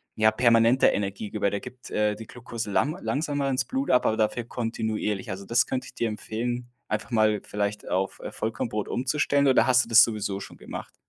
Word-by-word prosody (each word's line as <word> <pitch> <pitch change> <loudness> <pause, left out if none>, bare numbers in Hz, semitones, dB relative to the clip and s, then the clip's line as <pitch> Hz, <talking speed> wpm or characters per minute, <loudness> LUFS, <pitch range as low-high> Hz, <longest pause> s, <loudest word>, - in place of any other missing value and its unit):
ja, 110 0 +4
permanente 115 +2 +4
Energiegeber, 100 +1 -1
da 100 - -2
gibt, 125 +4 -11
äh, 105 0 +1
die 110 +1 -10
Glukose 115 -3 -6
lang 150 - +1
langsamer 145 -1 -1
ins 130 -1 0
Blut 270 +2 -1
ab, 125 - +4
aber 110 - +2
dafür 110 +2 0
kontinuierlich. 110 -4 -3
Also, 95 +1 -6
das 115 +3 +3
könnte 130 0 -3
ich - - -12
dir 115 - 0
empfehlen, 120 +3 -4 0.2
einfach 105 +2 -3
mal 110 -2 +3
vielleicht 105 0 -3
auf, 95 +1 -1
äh, - - -6
Vollkornbrot 110 -1 -3
umzustellen, 140 +2 +1
oder 130 -2 +4
hast 130 0 +5
du - - -14
das 115 0 +8
sowieso 105 -3 -2
schon - - -10
gemacht? - - -8
115 Hz, 195 wpm, -26 LUFS, 105-125 Hz, 0.2 s, das